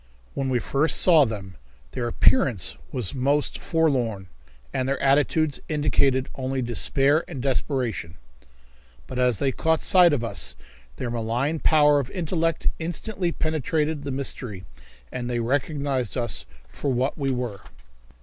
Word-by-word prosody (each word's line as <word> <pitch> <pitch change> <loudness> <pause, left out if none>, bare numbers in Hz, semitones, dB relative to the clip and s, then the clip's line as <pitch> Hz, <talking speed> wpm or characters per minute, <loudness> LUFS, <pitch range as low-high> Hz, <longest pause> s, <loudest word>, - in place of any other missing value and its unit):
When 135 -1 -2
we 130 - +2
first 140 +6 +2
saw 160 -6 +6
them 100 - -6 0.3
their 120 - -3
appearance 120 - +2 0.2
was 115 -7 -3
most 140 +3 0
forlorn, 125 - 0 0.4
and 130 0 -1
their 140 - -1
attitudes 145 +2 +2
indicated 140 -3 +2
only 130 0 -3
despair 135 +5 +2
and 135 - -7
desperation, 125 - -1 0.9
but 125 - -5
as 125 -3 +3
they 135 +4 +1
caught 160 +3 0
sight 180 -2 +6
of 140 -5 0
us 115 - -2 0.4
their 120 - -4
malign 120 +7 -1
power 150 -2 +5
of 135 -3 -4
intellect 165 -2 -1
instantly 175 +2 -2
penetrated 155 -1 -1
the 140 - -5
mystery, 130 -7 -4 0.5
and 120 -1 -4
they 120 -1 -1
recognized 135 0 -1
us 120 -3 -1 0.2
for 140 - -3
what 130 +2 0
we 140 -3 -2
were. 125 -6 -3
135 Hz, 140 wpm, -24 LUFS, 120-150 Hz, 0.9 s, saw